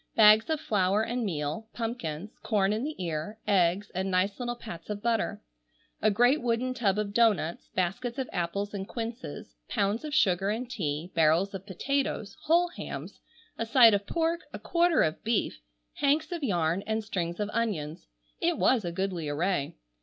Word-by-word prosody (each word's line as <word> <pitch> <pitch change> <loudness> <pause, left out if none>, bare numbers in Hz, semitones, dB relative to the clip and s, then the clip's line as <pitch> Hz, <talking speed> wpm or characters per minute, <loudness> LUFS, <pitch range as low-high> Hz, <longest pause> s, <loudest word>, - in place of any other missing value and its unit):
Bags 215 +2 +7
of 315 -1 +1
flour 205 -5 +1
and 240 +2 -2
meal, 160 +3 -3
pumpkins, 210 -6 -4
corn 205 -3 +1
in 220 +3 -2
the 305 +2 -3
ear, 170 +3 -4
eggs, 190 0 +2
and 190 +1 -1
nice 190 +3 +1
little 240 -1 -2
pats 190 -8 -9
of 205 0 -4
butter. 230 - 0 0.6
A 215 - +4
great 245 +8 +3
wooden 245 +1 0
tub 210 -6 +1
of 205 -1 -2
doughnuts, 205 -8 +2
baskets 235 +8 -1
of 265 -2 -2
apples 200 +4 -2
and 195 -1 -4
quinces, 230 - -6 0.2
pounds 205 +5 0
of 305 -1 -3
sugar 195 - +3
and 230 +4 -2
tea, 170 -7 -3
barrels 165 +5 +3
of 195 0 -7
potatoes, 215 0 -2
whole 345 +3 +4
hams, 190 - -7 0.4
a 230 - 0
side 230 -2 +7
of 200 0 0
pork, 335 0 0
a - - -6
quarter 345 -1 +3
of 155 0 -2
beef, 215 - 0 0.4
hanks 305 +3 +2
of 340 -3 -4
yarn, 175 -5 +1
and 220 0 -1
strings 175 -4 -3
of 210 0 -2
onions. 170 -10 -2 0.3
It - - +1
was 255 -4 +3
a 175 - -3
goodly 180 -4 -2
array. 155 0 -1
205 Hz, 175 wpm, -28 LUFS, 180-240 Hz, 0.6 s, Bags